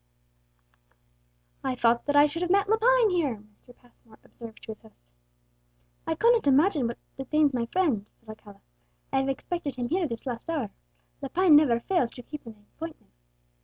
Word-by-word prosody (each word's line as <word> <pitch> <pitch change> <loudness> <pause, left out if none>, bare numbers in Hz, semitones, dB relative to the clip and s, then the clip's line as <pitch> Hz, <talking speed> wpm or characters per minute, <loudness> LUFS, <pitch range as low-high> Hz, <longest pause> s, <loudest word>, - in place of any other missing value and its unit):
"I 260 -1 -1
thought 235 +1 +2
that 290 - +1
I 290 0 +7
should 330 +3 -3
have 355 - -1
met 395 +2 +3
Lepine 450 +1 +4
here," 315 -9 0
Mr. 215 +4 -21
Passmore 235 -2 -23
observed 230 -1 -13
to 225 - -7
his 215 - -11
host. 135 - -22 1.0
"I 320 - 0
cannot 465 +1 +3
imagine 285 -1 +3
what 235 - -5 0.2
detains 285 +2 +1
my 235 -2 -1
friend," 265 - 0
said 230 - -34
Alcala; 215 -2 -13 0.5
"I - - +3
have 270 0 -1
expected 285 0 -4
him 245 -1 -3
here 350 +1 0
this 230 -1 -7
last 245 +4 -5
hour. 280 -11 -2 0.5
Lepine 325 +4 +4
never 275 -6 +5
fails 265 -2 0
to 245 - -10
keep 295 -1 -9
an 210 -2 -13
appointment." 325 -1 -9
270 Hz, 170 wpm, -27 LUFS, 235-335 Hz, 1.0 s, I